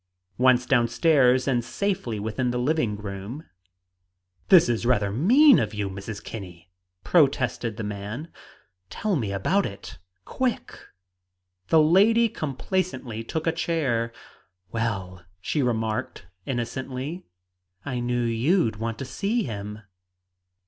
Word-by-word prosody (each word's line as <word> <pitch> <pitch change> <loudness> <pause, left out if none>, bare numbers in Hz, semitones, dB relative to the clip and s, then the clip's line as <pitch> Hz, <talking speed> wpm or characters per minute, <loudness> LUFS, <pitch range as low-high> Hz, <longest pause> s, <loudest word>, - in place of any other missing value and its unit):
Once 125 -1 +4
down 120 -3 +3
stairs 130 -1 +3
and 120 -3 +1
safely 130 - -2
within 110 +4 -2
the 120 - -1
living 125 -4 0
room 105 +8 -7 1.0
"This 180 -7 +7
is 120 -2 0
rather 105 -5 +2
mean 250 - +6
of 110 -1 -2
you 100 -2 -2
Mrs. 100 +2 -7
Kinney!" 90 -5 -9 0.3
protested 130 - +2
the 110 - -4
man. 105 +9 -5 0.6
"Tell 210 -3 -1
me 115 -9 -1
all - - -2
about 195 - +1
it, 100 - -10 0.3
quick!" 255 -2 -2 0.9
The 160 - +5
lady 220 +8 +5
complacently 140 - -3
took 160 +7 -4
a 165 - +3
chair. 145 -9 -1 0.6
"Well," 95 -6 -3 0.2
she 145 +10 -1
remarked 110 -4 -2 0.2
innocently, 130 +6 -4 0.6
"I 125 -3 -3
knew 120 0 -1
you'd 115 - +1
want 115 +1 -3
to 135 - -5
see 210 - -1
him." 105 -2 -6
125 Hz, 125 wpm, -25 LUFS, 110-160 Hz, 1.0 s, This